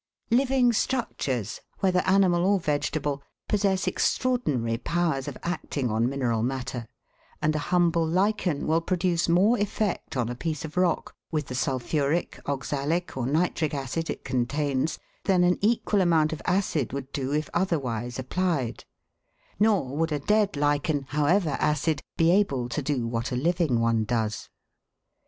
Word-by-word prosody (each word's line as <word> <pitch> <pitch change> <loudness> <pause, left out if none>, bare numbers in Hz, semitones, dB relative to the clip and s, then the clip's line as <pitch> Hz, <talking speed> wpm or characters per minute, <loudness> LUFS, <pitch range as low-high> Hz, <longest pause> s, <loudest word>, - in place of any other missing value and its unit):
Living 255 0 +3
structures, 135 - -1 0.2
whether 185 -2 +2
animal 185 -2 +4
or 195 +1 +3
vegetable, 145 -2 -1 0.3
possess 195 -2 +1
extraordinary 145 - 0
powers 160 -3 -1
of - - -5
acting 145 -7 -2
on 115 +3 +1
mineral 125 -5 0
matter, 125 -1 -3 0.5
and 155 0 +1
a - - +1
humble 170 -2 +3
lichen 185 -2 +1
will 160 +2 +2
produce 175 -1 0
more 200 +8 +4
effect 205 -7 -2
on 120 -2 +1
a 120 - -3
piece 155 +4 -3
of 155 - -9
rock 180 -1 +1 0.2
with 155 -3 -1
the 130 - -7
sulphuric, 140 +4 -1
oxalic, 145 +5 -2
or 125 -2 -2
nitric 155 0 0
acid 140 +4 -3
it - - -5
contains 135 +3 0 0.3
than 185 -2 +4
an 180 0 +3
equal 210 -1 +2
amount 160 -3 +3
of 150 - -6
acid 175 - 0
would 135 0 -5
do 135 -1 -3
if 150 +1 0
otherwise 125 - -1
applied; 130 - -1 0.7
nor 195 -11 +2
would 165 +1 0
a 150 - +1
dead 205 +6 +2
lichen, 145 0 +1
however 150 +2 +2
acid, 150 0 +1 0.2
be 165 0 +4
able 140 -11 +2
to 135 +5 -3
do 135 -4 -1
what 115 +1 -2
a - - -1
living 160 -2 +1
one 115 -1 +2
does. 110 -2 -2
155 Hz, 150 wpm, -26 LUFS, 130-180 Hz, 0.7 s, animal